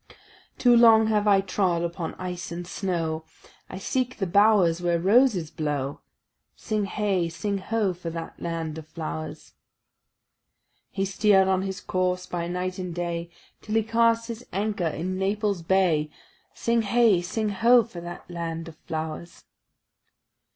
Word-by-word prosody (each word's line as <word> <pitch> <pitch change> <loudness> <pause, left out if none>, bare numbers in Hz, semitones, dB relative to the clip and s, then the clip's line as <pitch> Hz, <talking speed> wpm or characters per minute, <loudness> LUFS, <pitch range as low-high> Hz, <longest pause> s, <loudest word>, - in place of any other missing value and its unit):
"Too 245 -1 +5
long 225 -2 +7
have 210 -1 +1
I 200 -1 +5
trod 185 -3 0
upon 170 -1 -4
ice 180 -1 -6
and 175 +1 -5
snow; 165 -4 -2 0.5
I 185 - -7
seek 255 +6 -2
the 195 - -1
bowers 190 -3 +4
where 175 -1 +1
roses 195 - +3
blow." 145 -3 -3 0.6
Sing 215 -2 -2
heigh, 195 -4 0
sing 200 +4 -3
ho, 205 -1 0
for 175 -1 -6
that 165 0 -7
land 165 -2 -3
of 155 - -12
flowers! 155 -1 -6 1.4
He 195 -1 -2
steer'd 195 0 +3
on 190 -1 +2
his 190 0 -4
course 180 0 -1
by 170 -1 -3
night 180 +1 -3
and 180 -2 -5
day 170 -1 -3 0.3
Till 215 - -4
he 225 - +3
cast 230 +1 +2
his 230 0 -6
anchor 200 -2 -1
in 180 +4 -3
Naples 200 -1 0
Bay. 165 -4 +2 0.5
Sing 235 0 +1
heigh, 220 -3 +3
sing 210 +5 -2
ho, 230 +4 +5
for 200 -7 -9
that 175 0 -8
land 165 -1 -5
of 160 -1 -11
flowers! 160 +1 -6
185 Hz, 150 wpm, -26 LUFS, 170-210 Hz, 1.4 s, long